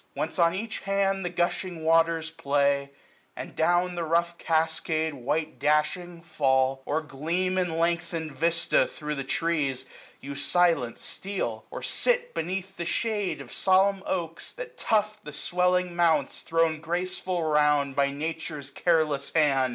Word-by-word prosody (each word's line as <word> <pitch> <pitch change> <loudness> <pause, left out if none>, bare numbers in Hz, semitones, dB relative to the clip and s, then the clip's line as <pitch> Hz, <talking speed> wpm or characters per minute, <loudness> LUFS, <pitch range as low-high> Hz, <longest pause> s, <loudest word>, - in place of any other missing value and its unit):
Whence 160 +4 -3
on 170 +1 +4
each 220 +3 -4
hand 195 0 0
the 180 - -1
gushing 175 -1 -2
waters 165 0 +3
play; 140 -2 +1 0.5
And - - -7
down 175 +2 +2
the 175 -1 -3
rough 170 +1 +1
cascade 160 0 0
white 145 +4 -2
dashing 155 +4 0
fall. 135 -4 +1
Or 155 +2 0
gleam 165 +6 -1
in 175 -3 -1
lengthened 170 -1 -1
vista 170 +4 +2
thro' 150 -1 -5
the 135 -2 -3
trees, 140 -3 -1 0.4
910 - - -9
You 140 - -4
silent 165 -6 +2
steal; 180 - -4
or - - -7
sit 485 0 +1
beneath 190 - -4
the 170 - -3
shade 210 0 -1
Of - - -10
solemn 195 +1 +3
oaks, 165 -3 -3
that - - -8
tuft 210 -1 0
the 150 - -8
swelling 180 +2 +1
mounts 160 -5 +2
Thrown 165 -1 +1
graceful 180 +1 -2
round 150 -3 +2
by 140 0 +3
Nature's 150 -1 -5
careless 150 -3 +1
hand. 140 -5 +3
165 Hz, 145 wpm, -27 LUFS, 150-180 Hz, 0.5 s, on